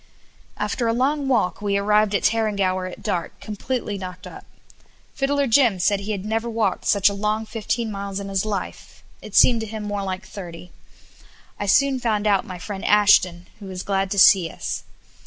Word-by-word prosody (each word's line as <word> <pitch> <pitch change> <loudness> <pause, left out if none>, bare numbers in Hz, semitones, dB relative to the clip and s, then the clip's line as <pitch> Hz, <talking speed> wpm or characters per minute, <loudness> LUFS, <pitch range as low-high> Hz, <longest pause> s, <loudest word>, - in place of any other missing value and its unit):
After 235 - -1
a 230 - +2
long 275 +4 0
walk 220 -9 +1
we 200 -1 0
arrived 210 +1 +2
at - - 0
Tarrangower 200 -5 +1
at - - -12
dark, 175 -2 -3
completely 215 -1 -4
knocked 180 -1 -8
up. - - -11 0.7
Fiddler 280 +1 0
Jim 235 -4 +4
said 195 +3 +1
he 200 +2 -5
had 200 -2 -4
never 225 +2 -2
walked 220 -5 -1
such 200 -2 +3
a 200 - +2
long 210 +2 -1
fifteen 225 +1 -3
miles 200 -1 -5
in 200 - -6
his 195 -1 -1
life; 205 -3 -6 0.2
it - - -10
seemed 235 -3 +5
to 220 - -5
him 215 0 -6
more 205 -1 -3
like 190 0 -4
thirty. 180 -3 -10 0.9
I 205 - -3
soon 270 +5 +3
found 215 -4 -1
out 200 -2 +2
my 185 - -7
friend 195 +2 -7
Ashton, 185 -4 +4
who 200 - -9
was 185 -1 -6
glad 195 -1 -1
to 200 - -3
see 185 -3 +6
us. - - -5
205 Hz, 190 wpm, -22 LUFS, 195-225 Hz, 0.9 s, see